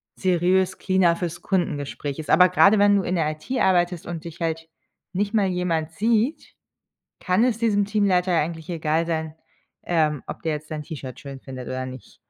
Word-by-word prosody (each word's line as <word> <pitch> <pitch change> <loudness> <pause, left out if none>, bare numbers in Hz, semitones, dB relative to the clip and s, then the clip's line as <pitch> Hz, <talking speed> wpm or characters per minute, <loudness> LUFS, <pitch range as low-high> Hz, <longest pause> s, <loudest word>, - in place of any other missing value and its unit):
"seriös" 185 +1 +1
cleaner 185 -3 +3
fürs 170 -1 -4
Kundengespräch 145 -5 -2
ist. 155 - -4
Aber 180 0 +7
grade 200 +1 +5
wenn 205 0 +5
du 195 - +2
in 180 - -2
der 160 -3 +1
IT 155 +10 -11
arbeitest 175 -2 +2
und 170 -2 -5
dich 170 0 -9
halt 165 0 -2 0.5
nicht 200 +2 -1
mal 205 -3 +3
jemand 170 -3 -1
sieht, 225 - 0 0.6
kann 185 +5 +2
es 230 -3 0
diesem 205 -3 +2
Teamleiter 195 -3 +1
eigentlich 160 +1 -4
egal 160 0 0
sein, 160 -1 -3 0.5
ähm, 155 -4 0
ob - - -7
der 160 -1 0
jetzt 150 +1 -7
dein 155 -1 -3
T-Shirt 140 -6 -8
schön 140 -1 -9
findet 130 -2 -8
oder 130 0 -3
nicht. 130 -1 -10
170 Hz, 180 wpm, -23 LUFS, 155-190 Hz, 0.6 s, Aber